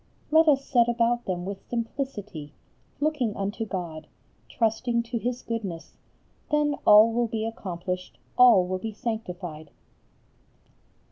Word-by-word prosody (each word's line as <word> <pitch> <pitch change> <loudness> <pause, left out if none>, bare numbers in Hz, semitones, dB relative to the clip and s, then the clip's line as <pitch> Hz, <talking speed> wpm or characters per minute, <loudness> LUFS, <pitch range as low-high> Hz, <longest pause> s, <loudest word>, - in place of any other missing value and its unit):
Let 320 +1 +6
us 275 -2 +4
set 240 -3 +3
about 240 0 +1
them 180 -1 -3
with 195 0 -7
simplicity, 220 - -4 0.5
looking 290 -8 0
unto 205 +3 -3
God, 165 -5 -5 0.4
trusting 235 +1 0
to 235 0 -3
His 245 +2 -3
goodness, 190 -8 -5 0.5
then 295 -1 +2
all 215 +2 +8
will 240 0 +1
be 225 -1 -3
accomplished, 185 -4 -5 0.2
all 240 -7 +7
will 185 +1 -3
be 220 +2 -5
sanctified. 180 -9 -5
225 Hz, 125 wpm, -26 LUFS, 185-240 Hz, 0.5 s, all